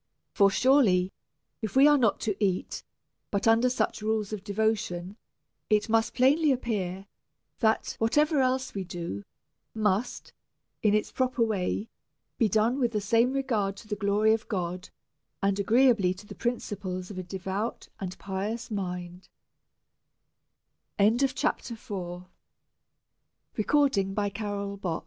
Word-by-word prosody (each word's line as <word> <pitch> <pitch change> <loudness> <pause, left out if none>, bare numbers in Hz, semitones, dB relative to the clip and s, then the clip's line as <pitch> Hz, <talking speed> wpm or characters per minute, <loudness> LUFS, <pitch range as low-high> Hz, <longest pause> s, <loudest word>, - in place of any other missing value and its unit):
For 200 -2 +5
surely, 195 -6 +3 0.5
if 220 +1 -4
we 270 +1 +7
are 295 - +6
not 235 -7 +2
to 210 -3 -1
eat 185 -2 -1 0.5
but 200 +2 -1
under 230 +3 +5
such 225 -3 -1
rules 215 -1 -1
of 205 -2 -5
devotion, 205 -3 -1 0.5
it 215 0 +2
must 225 0 +2
plainly 290 +4 +4
appear, 195 -7 -2 0.5
that 220 -1 +1
whatever 295 +6 +3
else 255 0 0
we 195 - -3
do 170 - -5 0.5
must, 215 +1 -1 0.5
in 210 -1 +3
its 215 - 0
proper 255 -2 +1
way, 210 0 -1 0.5
be 225 -4 +3
done 220 +6 +2
with 240 -3 +1
the 210 - +1
same 230 +4 +2
regard 220 -8 -1
to 215 - -12
the 210 - -2
glory 205 +2 +2
of 225 +1 -2
God, 180 -2 -3 0.5
and 200 0 +1
agreeably 220 -3 +4
to 200 - -13
the - - -9
principles 200 -6 -4
of 190 - -6
a - - -2
devout 190 +4 -4
and 185 -2 -5
pious 200 +5 -4
mind. 180 -2 -5 1.7
CHAPTER 240 +2 +1
V. 180 -6 -6 1.3
Persons 200 - 0
210 Hz, 125 wpm, -28 LUFS, 195-235 Hz, 1.7 s, we